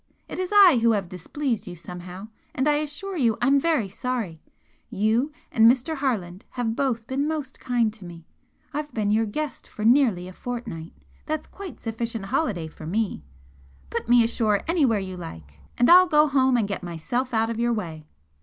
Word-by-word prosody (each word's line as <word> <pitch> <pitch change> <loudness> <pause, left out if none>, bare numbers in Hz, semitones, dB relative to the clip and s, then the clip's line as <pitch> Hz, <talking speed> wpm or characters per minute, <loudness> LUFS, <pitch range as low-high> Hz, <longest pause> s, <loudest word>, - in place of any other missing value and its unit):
It - - -6
is 370 +1 -2
I 390 - +7
who 230 0 +4
have 195 -4 -2
displeased 230 - -3
you 180 - -6
somehow, 180 +4 -9 0.3
and 265 +3 +1
I 295 0 +4
assure 305 +6 -4
you 235 -9 +2
I'm 275 +3 +4
very 305 -9 +1
sorry! 205 -6 -4 0.5
You 225 +8 +1 0.2
and 225 0 +6
Mr. 265 +5 -1
Harland 210 -8 -2
have 230 -2 -1
both 240 -5 -1
been 270 +4 -1
most 300 -4 -4
kind 235 -4 +1
to 220 -3 -14
me 170 -2 -11 0.5
I've 295 +1 -3
been 210 -2 +1
your 220 +1 +2
guest 285 +3 -4
for 215 - -6
nearly 230 -8 +4
a 185 - -9
fortnight, 230 -9 -6 0.3
that's 310 0 -2
quite 380 -7 -10
sufficient 225 -2 -3
holiday 210 - -1
for 155 0 -10
me 205 - -1 0.7
put - - -3
me 240 -1 +7
ashore 220 -3 +1
anywhere 290 -10 +3
you 190 -2 -5
like 80 - -10 0.2
and 245 - +4
I'll 365 +1 +8
go 300 -2 +5
home 265 -3 +3
and 220 -4 +1
get 200 - -4
myself 180 - -3
out 225 0 +1
of 230 - -4
your 240 0 +2
way. 165 -9 -4
230 Hz, 185 wpm, -25 LUFS, 195-275 Hz, 0.7 s, I'll